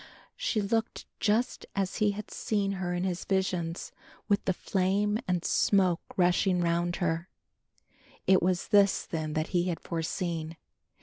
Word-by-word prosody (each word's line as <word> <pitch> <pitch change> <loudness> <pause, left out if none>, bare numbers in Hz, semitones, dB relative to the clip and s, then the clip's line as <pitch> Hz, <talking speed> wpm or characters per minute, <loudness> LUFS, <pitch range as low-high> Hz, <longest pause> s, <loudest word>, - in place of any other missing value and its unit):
She - - 0
looked 225 +2 -1
just 225 +4 0
as 195 -2 -1
he 210 - +3
had 210 +1 -7
seen 200 -2 -1
her 185 -2 -2
in 175 - -1
his 180 -2 -2
visions 180 -3 -1 0.4
with 200 -1 +2
the - - +3
flame 200 +4 0
and 180 -2 0
smoke 185 -4 +3 0.2
rushing 180 0 +3
round 175 0 +1
her. 170 -1 -1 1.0
It 190 -1 +5
was 180 0 0
this 200 -1 +4
then 155 -2 -3
that 155 +1 -1
he 175 -1 +1
had 170 -3 -2
foreseen. 165 -1 -3
185 Hz, 145 wpm, -29 LUFS, 170-200 Hz, 1.0 s, It